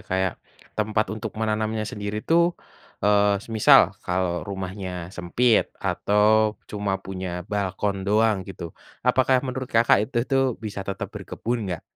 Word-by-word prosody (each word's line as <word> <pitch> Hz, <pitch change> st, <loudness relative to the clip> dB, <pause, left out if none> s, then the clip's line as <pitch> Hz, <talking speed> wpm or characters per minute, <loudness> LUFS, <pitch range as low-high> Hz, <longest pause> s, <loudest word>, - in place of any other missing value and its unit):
kayak, 95 Hz, -1 st, +1 dB, 0.4 s
tempat 110 Hz, 0 st, 0 dB
untuk 110 Hz, 0 st, -6 dB
menanamnya 110 Hz, 0 st, -1 dB
sendiri 105 Hz, +1 st, -5 dB
tuh, 170 Hz, +1 st, +4 dB, 0.6 s
eee, 105 Hz, 0 st, +4 dB
semisal 110 Hz, -2 st, +5 dB
kalau 90 Hz, -1 st, 0 dB
rumahnya 95 Hz, -2 st, -5 dB
sempit 105 Hz, +6 st, +2 dB
atau 105 Hz, +1 st, +2 dB
cuma 105 Hz, -2 st, -2 dB
punya 95 Hz, -1 st, -5 dB, 0.2 s
balkon 100 Hz, 0 st, -1 dB
doang 110 Hz, +1 st, +3 dB
gitu, 85 Hz, -3 st, -7 dB, 0.3 s
apakah 130 Hz, +1 st, +4 dB
menurut 130 Hz, 0 st, -4 dB
Kakak 115 Hz, -3 st, +4 dB
itu 130 Hz, -, -8 dB
tuh 135 Hz, -1 st, +2 dB, 0.2 s
bisa 100 Hz, -2 st, -4 dB
tetap 100 Hz, -1 st, -3 dB
berkebun 120 Hz, +1 st, -3 dB
nggak? 90 Hz, -3 st, -4 dB
105 Hz, 130 wpm, -24 LUFS, 95-110 Hz, 0.6 s, semisal